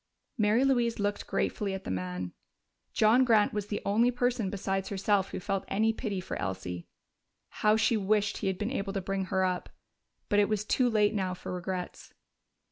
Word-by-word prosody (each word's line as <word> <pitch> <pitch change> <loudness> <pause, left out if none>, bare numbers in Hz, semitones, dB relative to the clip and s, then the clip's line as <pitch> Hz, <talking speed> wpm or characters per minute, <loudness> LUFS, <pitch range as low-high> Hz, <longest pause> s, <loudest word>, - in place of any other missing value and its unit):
Mary 220 +2 +3
Louise 240 -4 +2
looked 205 0 -2
gratefully 200 -2 -1
at 190 - -7
the - - -4
man: 90 -1 -4 0.6
John 225 +4 +5
Grant 225 -4 +4
was 210 -1 -2
the 205 - -3
only 225 +5 +3
person 245 -4 0
besides 195 0 -2
herself 200 0 +1
who - - -5
felt 195 +1 -2
any 220 +3 +2
pity 210 -4 -3
for 185 - -5
Elsie. 90 -1 -4 0.7
How 210 0 +5
she 225 +1 +3
wished 205 0 +1
he 195 - -2
had 190 -1 0
been 210 +5 -2
able 195 -7 -2
to 195 - -1
bring 195 +1 -2
her 190 0 0
up!... 180 -1 -2 0.6
But 205 - +3
it 205 - +3
was 210 -1 0
too 250 +3 +2
late 210 -2 +3
now 190 -3 -1
for 180 - -6
regrets. 180 0 -5
205 Hz, 190 wpm, -29 LUFS, 190-220 Hz, 0.7 s, John